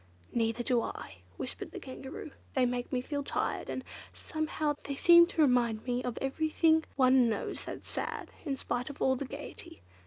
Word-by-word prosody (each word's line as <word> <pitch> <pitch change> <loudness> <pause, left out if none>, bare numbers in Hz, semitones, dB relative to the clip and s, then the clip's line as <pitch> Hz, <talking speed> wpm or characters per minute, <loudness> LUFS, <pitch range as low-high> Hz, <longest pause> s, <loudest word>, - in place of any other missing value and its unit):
"Neither 230 +1 +1
do 245 -1 +2
I," - - -6 0.2
whispered - - -5
the - - -7
Kangaroo; 265 +3 -8 0.2
"they 260 -2 +4
make 245 0 -2
me 255 -2 +1
feel 285 +2 -3
tired; - - -2
and, 260 - -3 0.3
somehow, 310 -1 -2
they 280 - -3
seem 340 +3 +8
to 325 -3 +2
remind 240 -5 +2
one 245 0 0
of 245 -2 -3
everything 315 +3 +2
one 255 -2 +5
knows 215 - -3
that's - - -7
sad, - - -4
in 275 -4 -2
spite 245 +2 -2
of 285 - -9
all 260 - +3
the 275 - -3
gaiety." 275 - -9
265 Hz, 180 wpm, -31 LUFS, 245-295 Hz, 0.3 s, seem